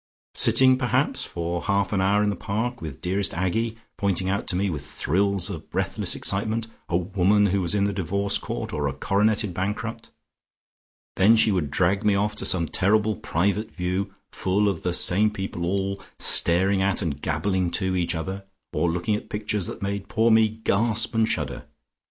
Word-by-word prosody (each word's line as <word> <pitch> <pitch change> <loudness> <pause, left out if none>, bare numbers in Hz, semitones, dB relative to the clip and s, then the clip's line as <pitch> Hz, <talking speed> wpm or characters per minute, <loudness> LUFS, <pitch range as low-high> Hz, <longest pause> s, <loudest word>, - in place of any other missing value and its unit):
"Sitting 130 0 +5
perhaps 125 -2 0
for 85 0 -3
half 100 0 0
an 95 - +1
hour 100 +2 +3
in 105 - +1
the - - -3
Park, 115 +5 -3
with 75 -5 -7
dearest 95 +1 -1
Aggie 110 +6 -1 0.2
pointing 95 -2 0
out 100 +1 -2
to - - -1
me, 100 +2 +1
with 75 -6 -4
thrills 95 +6 0
of - - -7
breathless - - -1
excitement, 110 +3 0 0.2
a 85 - +2
woman 95 +3 +2
who 100 0 +1
was 90 +3 0
in 100 - +2
the 100 0 0
divorce 100 +2 -1
court, - - -5
or 75 -1 -1
a 70 - -2
coroneted 105 +4 +1
bankrupt. 110 +5 -4 1.1
Then 105 +4 +6
she 110 -1 +3
would 90 -7 -1
drag 95 +7 +1
me 105 -1 +3
off 105 +2 0
to 95 - -1
some 85 -3 +1
terrible 105 +4 +1
private 100 +6 -1
view 90 +2 -2 0.2
full 100 +2 0
of 95 -5 -1
the 90 - -1
same 100 +4 +4
people 95 -4 -4
all 100 +1 -2 0.2
staring 95 +3 +4
at 100 +1 0
and 75 -5 -3
gabbling 95 -3 0
to 95 -1 0
each 85 -1 0
other, 95 +5 -5 0.3
or 85 +3 +1
looking 90 +6 -1
at 105 - -7
pictures 105 -2 -2
that - - -7
made 100 0 -3
poor 115 +2 +2
me 110 0 +5
gasp 110 +1 0
and 110 -1 +2
shudder. - - -3
100 Hz, 185 wpm, -24 LUFS, 90-105 Hz, 1.1 s, Then